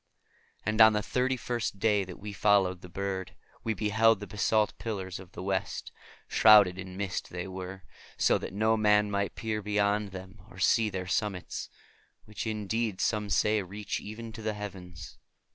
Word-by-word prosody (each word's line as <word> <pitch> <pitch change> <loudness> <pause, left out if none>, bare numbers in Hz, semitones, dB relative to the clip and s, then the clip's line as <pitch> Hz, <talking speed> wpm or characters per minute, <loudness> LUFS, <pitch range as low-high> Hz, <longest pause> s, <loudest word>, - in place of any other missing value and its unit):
And 110 +2 +2
on 110 0 +9
the 105 0 0
thirty 130 +3 0
first 120 -4 -3
day 105 0 +2
that 90 -1 -9
we 105 0 -7
followed 95 -2 +3
the 90 - -11
bird, 95 -1 -4 0.3
we 110 -1 -1
beheld 110 +1 +3
the 105 - -6
basalt 105 +2 +1
pillars 95 -5 -4
of 95 -1 -13
the - - -7
West. 95 0 -2 0.4
Shrouded 105 -4 +6
in 95 0 -7
mist 95 -2 -3
they 90 +1 -5
were, 95 0 -7 0.3
so - - +3
that - - -6
no 110 +3 +2
man 105 -1 +3
might 100 0 -1
peer 110 -1 -2
beyond 105 0 +1
them 95 +2 -10
or 90 - -14
see 110 +4 +3
their 95 -2 -4
summitsŌĆöwhich 105 +2 -5
indeed 110 -1 -2
some 105 -2 0
say 105 +3 +2
reach 100 +2 -4
even 110 +2 -8
to 110 - -9
the 110 0 -1
heavens. 90 -6 -8
100 Hz, 170 wpm, -29 LUFS, 95-110 Hz, 0.4 s, on